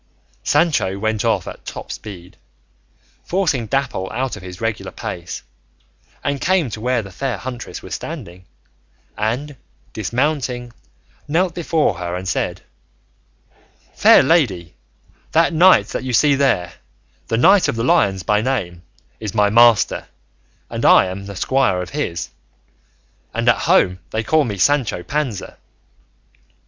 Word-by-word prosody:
Sancho 120 Hz, -, +1 dB
went 110 Hz, +1 st, -1 dB
off -, -, 0 dB
at -, -, -9 dB
top -, -, -8 dB
speed, 90 Hz, -4 st, -9 dB, 0.9 s
forcing 165 Hz, -, 0 dB
Dapple 125 Hz, -7 st, -2 dB
out 130 Hz, +2 st, -2 dB
of 105 Hz, -, -10 dB
his 90 Hz, -1 st, -9 dB
regular 110 Hz, -4 st, -3 dB
pace, 85 Hz, -1 st, -6 dB, 0.8 s
and 140 Hz, -1 st, -2 dB
came 175 Hz, -9 st, +1 dB
to 105 Hz, -, -6 dB
where 125 Hz, -1 st, 0 dB
the 100 Hz, -, -10 dB
fair 125 Hz, +3 st, -3 dB
huntress 125 Hz, +3 st, -7 dB
was -, -, -8 dB
standing, 90 Hz, +1 st, -7 dB, 0.7 s
and 125 Hz, +7 st, -2 dB, 0.4 s
dismounting 125 Hz, +2 st, -2 dB, 0.5 s
knelt 170 Hz, +3 st, +1 dB
before 160 Hz, -, 0 dB
her 90 Hz, -1 st, -3 dB
and 95 Hz, +1 st, -5 dB
said, -, -, -2 dB, 1.3 s
"Fair -, -, +6 dB
lady, 105 Hz, -, +1 dB, 0.6 s
that 165 Hz, +2 st, +3 dB
knight 180 Hz, +4 st, +5 dB
that -, -, -4 dB
you 130 Hz, -1 st, -3 dB
see 145 Hz, +5 st, +4 dB
there, 135 Hz, -11 st, +1 dB, 0.5 s
the 115 Hz, -, 0 dB
Knight 190 Hz, -, +5 dB
of -, -, -1 dB
the 115 Hz, -, -2 dB
Lions 100 Hz, -, +2 dB
by 105 Hz, 0 st, +2 dB
name, 105 Hz, -9 st, -2 dB, 0.4 s
is 110 Hz, -1 st, -5 dB
my 105 Hz, -1 st, +3 dB
master, 115 Hz, -1 st, +4 dB, 0.6 s
and -, -, -5 dB
I -, -, +7 dB
am 100 Hz, +2 st, -6 dB
a 100 Hz, -, -7 dB
squire 130 Hz, -4 st, +1 dB
of 90 Hz, -, -5 dB
his, 115 Hz, -, -3 dB, 1.1 s
and -, -, -1 dB
at -, -, +6 dB
home 90 Hz, 0 st, +4 dB
they 110 Hz, +1 st, -2 dB
call 155 Hz, +6 st, +2 dB
me 105 Hz, -4 st, -4 dB
Sancho 125 Hz, -6 st, +1 dB
Panza. 140 Hz, -6 st, -3 dB
115 Hz, 140 wpm, -19 LUFS, 95-140 Hz, 1.3 s, I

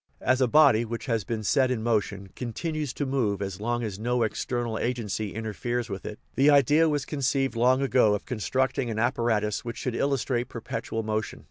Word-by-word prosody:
As 130 Hz, +1 st, +2 dB
a 130 Hz, -, +4 dB
body 120 Hz, -4 st, +5 dB
which 115 Hz, +3 st, -5 dB
has 115 Hz, -5 st, 0 dB
been 110 Hz, 0 st, -4 dB
set 130 Hz, +5 st, +3 dB
in 120 Hz, -4 st, -1 dB
motion 105 Hz, -4 st, -1 dB
continues 150 Hz, +4 st, -3 dB
to 145 Hz, -, -2 dB
move 125 Hz, -7 st, 0 dB
as 100 Hz, -1 st, -5 dB
long 120 Hz, +2 st, -1 dB
as 105 Hz, -3 st, -4 dB
no 120 Hz, +1 st, +1 dB
external 120 Hz, +1 st, -2 dB
agency 110 Hz, -4 st, -2 dB
interferes 115 Hz, +2 st, -3 dB
with 95 Hz, -, -5 dB
it, 105 Hz, -, -6 dB, 0.2 s
the 140 Hz, +2 st, +4 dB
idea 145 Hz, +3 st, +5 dB
was 145 Hz, -2 st, -1 dB
conceived 135 Hz, -2 st, 0 dB
long 130 Hz, +3 st, +3 dB
ago 125 Hz, -6 st, +4 dB
of 105 Hz, -, -6 dB
constructing 130 Hz, +2 st, -1 dB
an 110 Hz, -, -3 dB
apparatus 110 Hz, -2 st, 0 dB
which 115 Hz, -1 st, -6 dB
should 125 Hz, -, -3 dB
illustrate 130 Hz, -2 st, 0 dB
perpetual 115 Hz, -1 st, -4 dB
motion. 110 Hz, 0 st, -3 dB
120 Hz, 190 wpm, -27 LUFS, 110-130 Hz, 0.2 s, body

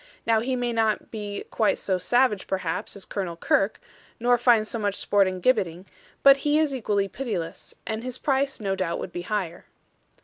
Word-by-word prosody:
Now 225 Hz, -1 st, +3 dB
he 255 Hz, +3 st, -1 dB
may 245 Hz, -1 st, -1 dB
not 220 Hz, -2 st, 0 dB
be 205 Hz, -2 st, -5 dB
quite 220 Hz, -2 st, +2 dB
so 190 Hz, -2 st, -1 dB
savage 230 Hz, +2 st, +2 dB
perhaps 185 Hz, 0 st, -3 dB
as 200 Hz, -, -8 dB
Colonel 180 Hz, -4 st, -4 dB
Kirke, 195 Hz, +4 st, +1 dB, 0.4 s
nor 245 Hz, +1 st, +4 dB
find 240 Hz, -3 st, +4 dB
so 230 Hz, -, -4 dB
much 205 Hz, -2 st, 0 dB
sport 200 Hz, -1 st, +3 dB
in 185 Hz, -1 st, -4 dB
gibbeting; 180 Hz, -6 st, +1 dB, 0.4 s
but 275 Hz, 0 st, +8 dB
he 295 Hz, +1 st, +1 dB
is 310 Hz, -3 st, +2 dB
equally 205 Hz, -6 st, 0 dB
pitiless, 195 Hz, -7 st, -5 dB
and 220 Hz, +1 st, -3 dB
his 255 Hz, 0 st, -5 dB
price 275 Hz, -1 st, 0 dB
no 195 Hz, -3 st, -1 dB
doubt 185 Hz, -3 st, -1 dB
would -, -, -6 dB
be 175 Hz, -, -4 dB
higher.' 180 Hz, -3 st, -3 dB
215 Hz, 190 wpm, -25 LUFS, 190-245 Hz, 0.4 s, but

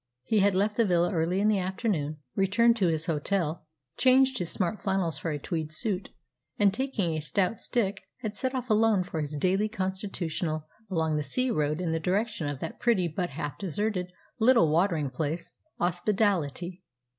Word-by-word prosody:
He 215 Hz, +10 st, +2 dB
had 200 Hz, -1 st, +3 dB
left 205 Hz, +2 st, +1 dB
the 230 Hz, -, +4 dB
villa 175 Hz, +1 st, +2 dB
early 170 Hz, +3 st, +1 dB
in 210 Hz, -, +3 dB
the 210 Hz, -2 st, +3 dB
afternoon, 185 Hz, -5 st, -1 dB, 0.2 s
returned 205 Hz, +5 st, +4 dB
to 195 Hz, -5 st, +2 dB
his 160 Hz, -1 st, 0 dB
hotel, 160 Hz, 0 st, -1 dB, 0.3 s
changed 260 Hz, +1 st, +4 dB
his 175 Hz, -2 st, -2 dB
smart 185 Hz, +3 st, -1 dB
flannels 185 Hz, -6 st, 0 dB
for 165 Hz, -, -3 dB
a 150 Hz, -, -1 dB
tweed 155 Hz, +1 st, -3 dB
suit, 195 Hz, +3 st, -2 dB, 0.5 s
and, 200 Hz, -2 st, +4 dB
taking 215 Hz, -8 st, -1 dB
a 155 Hz, -, -1 dB
stout 185 Hz, +7 st, 0 dB
stick, 205 Hz, -5 st, 0 dB, 0.2 s
had 215 Hz, -3 st, -4 dB
set 260 Hz, +4 st, -2 dB
off 250 Hz, -2 st, -2 dB
alone 215 Hz, -3 st, +4 dB
for 165 Hz, -3 st, -4 dB
his 150 Hz, 0 st, -4 dB
daily 190 Hz, +7 st, +2 dB
constitutional 185 Hz, -6 st, -3 dB, 0.2 s
along 160 Hz, -4 st, 0 dB
the 150 Hz, -, -1 dB
sea 250 Hz, -, 0 dB
road 150 Hz, -3 st, 0 dB
in 175 Hz, -3 st, -1 dB
the 160 Hz, -, 0 dB
direction 190 Hz, 0 st, -1 dB
of 145 Hz, -1 st, -3 dB
that 165 Hz, -, -5 dB
pretty 215 Hz, -8 st, +2 dB
but 175 Hz, +2 st, -2 dB
half 145 Hz, 0 st, -5 dB
deserted 190 Hz, 0 st, -2 dB, 0.3 s
little 225 Hz, -9 st, +5 dB
watering 160 Hz, -4 st, +2 dB
place, 155 Hz, +5 st, -3 dB, 0.3 s
Ospedaletti. 180 Hz, -, 0 dB
185 Hz, 180 wpm, -28 LUFS, 160-210 Hz, 0.5 s, little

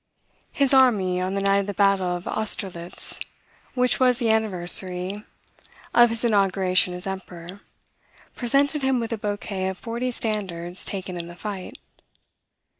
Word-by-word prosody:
His 280 Hz, -1 st, +2 dB
army, 205 Hz, -9 st, +4 dB
on 185 Hz, +1 st, -2 dB
the 195 Hz, -, -1 dB
night 200 Hz, 0 st, +3 dB
of 200 Hz, -, -3 dB
the 205 Hz, -, -4 dB
battle 195 Hz, -2 st, +2 dB
of 175 Hz, -, -7 dB
Austerlitz, 190 Hz, -5 st, -4 dB, 0.6 s
which 250 Hz, 0 st, +2 dB
was 250 Hz, -2 st, +4 dB
the 230 Hz, -2 st, +1 dB
anniversary 185 Hz, -2 st, +1 dB, 0.7 s
of 240 Hz, 0 st, +6 dB
his 230 Hz, +1 st, +1 dB
inauguration 190 Hz, -4 st, +2 dB
as 180 Hz, -, -7 dB
Emperor, 190 Hz, -1 st, -7 dB, 0.7 s
presented 280 Hz, +4 st, +2 dB
him 265 Hz, -1 st, +2 dB
with 230 Hz, 0 st, -3 dB
a -, -, -2 dB
bouquet 205 Hz, -2 st, -3 dB
of 190 Hz, 0 st, -4 dB
forty 235 Hz, +3 st, -3 dB
standards 190 Hz, -7 st, -3 dB
taken 185 Hz, -2 st, -4 dB
in 170 Hz, -, -5 dB
the 175 Hz, -, -10 dB
fight. 195 Hz, 0 st, -6 dB
200 Hz, 145 wpm, -24 LUFS, 185-230 Hz, 0.7 s, of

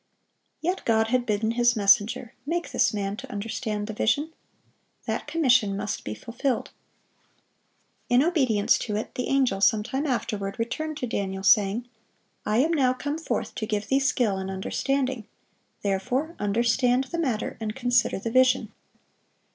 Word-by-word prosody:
Yet 360 Hz, +4 st, -1 dB
God 225 Hz, -1 st, +2 dB
had 250 Hz, 0 st, +1 dB
bidden 220 Hz, +1 st, +1 dB
His 240 Hz, 0 st, +3 dB
messenger, 215 Hz, +4 st, +3 dB
"Make 340 Hz, +5 st, -2 dB
this -, -, +3 dB
man 200 Hz, -1 st, -2 dB
to -, -, -9 dB
understand 210 Hz, 0 st, -3 dB
the 220 Hz, -, -5 dB
vision." 290 Hz, +9 st, 0 dB, 0.7 s
That -, -, -3 dB
commission 250 Hz, -10 st, +3 dB
must 200 Hz, 0 st, -3 dB
be 105 Hz, -, -5 dB
fulfilled. 245 Hz, -, -3 dB, 1.4 s
In 245 Hz, +2 st, +5 dB
obedience 260 Hz, -, +2 dB
to 210 Hz, -, -3 dB
it, 215 Hz, -, -4 dB
the 250 Hz, -, -3 dB
angel, 260 Hz, -8 st, +1 dB
some 210 Hz, +1 st, +4 dB
time 270 Hz, +6 st, -2 dB
afterward, 205 Hz, -6 st, -2 dB
returned 300 Hz, +7 st, -3 dB
to 255 Hz, -, -2 dB
Daniel, 195 Hz, -4 st, -3 dB
saying, 210 Hz, +4 st, +3 dB, 0.6 s
"I 210 Hz, +1 st, +2 dB
am 300 Hz, +7 st, +3 dB
now 260 Hz, -5 st, +3 dB
come 290 Hz, +4 st, -4 dB
forth 325 Hz, -, -3 dB
to 220 Hz, -3 st, -4 dB
give 210 Hz, -1 st, -2 dB
thee 270 Hz, -, +3 dB
skill 250 Hz, -7 st, +1 dB
and 190 Hz, 0 st, -4 dB
understanding;" 255 Hz, +5 st, -2 dB, 0.6 s
"therefore 245 Hz, -, -1 dB
understand 240 Hz, +4 st, +2 dB
the 335 Hz, +6 st, -5 dB
matter, 250 Hz, -9 st, -1 dB
and 215 Hz, -1 st, -4 dB
consider 245 Hz, -3 st, +2 dB
the 225 Hz, +4 st, -4 dB
vision." 255 Hz, +1 st, +3 dB
235 Hz, 155 wpm, -26 LUFS, 210-265 Hz, 1.4 s, In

